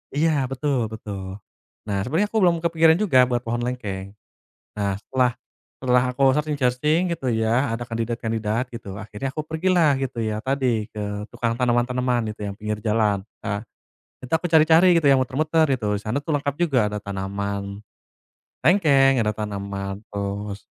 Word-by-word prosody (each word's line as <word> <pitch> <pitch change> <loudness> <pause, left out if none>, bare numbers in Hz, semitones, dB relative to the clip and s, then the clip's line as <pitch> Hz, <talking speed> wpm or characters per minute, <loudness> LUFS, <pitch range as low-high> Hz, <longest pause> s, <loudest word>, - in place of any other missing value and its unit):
Iya, 160 +2 +3 0.2
betul 130 -5 -1
betul. 100 -2 -7 0.5
Nah, 100 -1 -1
sebenarnya 165 - +1
aku 220 - +1
belum 170 -2 +4
kepikiran 165 -1 +4
juga 130 -12 +5
buat 120 -1 0
pohon 120 +1 -2
lengkeng. 100 -6 -4 0.7
Nah, 100 -1 -1
setelah 125 +2 +1 0.5
setelah 125 -1 +3
aku 130 +2 -3
searching-searching 150 +3 +1
gitu 135 - -7
ya, 115 +3 +1
ada 120 - -4
kandidat-kandidat 115 0 -2
gitu, 100 -5 -8
akhirnya 110 +5 -5
aku 155 - -2
pergilah 160 -2 +2
gitu 130 -3 -4
ya, 110 -1 -2
tadi, 130 -5 0
ke 105 -1 -6 0.3
tukang 120 -1 -1
tanaman-tanaman 125 -1 +1
gitu 105 - -6
yang - - -7
pinggir 105 0 -3
jalan. 105 -3 +1 0.2
Eee, 100 +1 -2 0.6
itu 125 - -9
aku 165 +2 +1
cari-cari 165 +2 +6
gitu 160 -4 +3
ya, - - +7
muter-muter 155 +5 +2
gitu, 105 -4 -2
di - - -14
sana 110 +5 -2
tuh 160 - -3
lengkap 140 0 -2
juga, 150 -7 +1
ada 105 0 -3
tanaman 100 +1 -4 0.8
lengkeng, 135 - +5
ada 105 - +1
tanaman 100 -1 -5
terus 100 0 -4
120 Hz, 155 wpm, -23 LUFS, 105-145 Hz, 0.8 s, ya